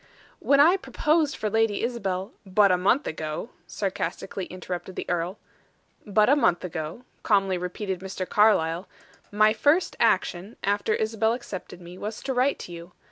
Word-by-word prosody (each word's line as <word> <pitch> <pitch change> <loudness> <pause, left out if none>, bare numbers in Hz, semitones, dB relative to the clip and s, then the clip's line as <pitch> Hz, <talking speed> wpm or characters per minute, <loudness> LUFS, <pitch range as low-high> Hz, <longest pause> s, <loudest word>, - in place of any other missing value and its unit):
"When 280 0 +3
I 335 +7 +6
proposed 310 -4 +1
for 215 - -3
Lady 225 0 +1
Isabel 195 -5 -2
" - - -43
"But 200 0 +4
a - - +5
month 235 +10 +2
ago," 155 +8 -4 0.2
sarcastically 190 -1 -3
interrupted 185 0 -6
the - - -5
earl. 175 +3 -2 0.7
"But 210 +1 +4
a 280 - +6
month 175 -12 +2
ago," 160 +5 -5 0.2
calmly 195 -3 +2
repeated 180 +1 -4
Mr. 190 0 -5
Carlyle, 180 -5 +3 0.4
"my 215 +1 +4
first 290 +10 +2
action, 185 +6 +1
after 205 +2 +1
Isabel 220 +1 +1
accepted 200 -7 -7
me, 175 +2 -11
was 210 +1 -5
to 270 - -2
write 255 +3 +2
to - - -11
you. 170 +1 -10
200 Hz, 160 wpm, -26 LUFS, 180-225 Hz, 0.7 s, I